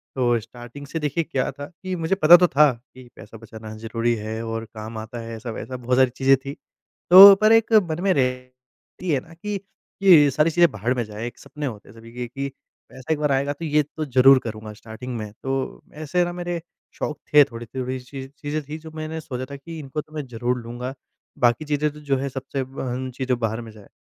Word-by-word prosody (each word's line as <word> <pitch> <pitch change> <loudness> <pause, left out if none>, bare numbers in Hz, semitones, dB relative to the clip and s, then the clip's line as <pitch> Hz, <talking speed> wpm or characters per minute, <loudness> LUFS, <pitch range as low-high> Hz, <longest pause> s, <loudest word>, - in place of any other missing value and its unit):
तो 120 -3 +2
स्टार्टिंग 120 +5 -11
से 165 - -4
देखिए 155 +2 -1
क्या 135 -5 -2
था 145 +1 -8 0.2
कि 185 -1 -3
मुझे 165 +2 0
पता 175 -2 +8
तो 180 0 +4
था 150 -1 +5
कि 125 +2 -17
पैसा 115 - -12
बचाना 110 -1 -10
ज़रूरी 115 +1 -1
है 110 +1 -5
और 115 0 -4
काम 110 +1 -7
आता 110 +2 -7
है 115 0 -7
ऐसा-वैसा 120 +3 -6
बहुत 125 0 -1
सारी 130 -1 +5
चीज़ें 135 0 +4
थी। 140 +1 -7 0.6
तो 195 +2 +12
पर 215 +1 +5
एक 225 0 +4 0.2
मन 155 +2 -3
में 195 - +3
रहती 125 +5 -4
हैं 135 -3 +1
न - - -13
कि 205 -1 -2 0.4
ये 160 -7 +7
सारी 150 +5 +2
चीज़ें 170 -1 +4
भाड़ 115 +3 -1
में 120 - -1
जाएँ। 105 +1 -7
एक 120 - -9
सपने 150 -1 -7
होते 110 -7 -7
हैं 105 - -15
सभी 115 0 -13
के 125 0 -5
कि 135 +4 -4 0.4
पैसा 130 +4 -3
एक 150 - -4
बार 150 -2 +1
आएगा 140 +1 +1
तो 165 +3 -7
ये 150 -1 +2
तो 155 +2 -6
ज़रूर 135 0 +6
करूँगा 110 -1 -7
स्टार्टिंग 115 +3 -8
में। 105 -1 -6
तो 135 0 -3
ऐसे 155 +4 0
न 175 0 -5
मेरे 175 -1 -4 0.3
शौक 150 -1 -4
थे, 150 -1 +9
थोड़ी-थोड़ी 130 +1 -5
चीज़ें 140 +4 -6
थी 150 +2 -7
जो 160 0 -11
मैंने 155 +1 -5
सोचा 130 -4 -5
था - - -5
कि 160 +4 -9
इनको 145 +1 -5
तो 155 - -22
मैं 150 -2 -4
ज़रूर 125 +1 -2
लूँगा। 120 +3 -6 0.5
बाकी 120 +4 +2
चीज़ें 150 0 0
तो 150 - -12
जो 140 -2 0
है 135 +1 -3
सबसे 135 +1 -5
अ, 130 -1 -4
चीज़ें 130 -2 -1
भाड़ 115 -1 -1
में 115 -1 -10
जाए। 105 -2 -16
130 Hz, 220 wpm, -23 LUFS, 120-150 Hz, 0.6 s, तो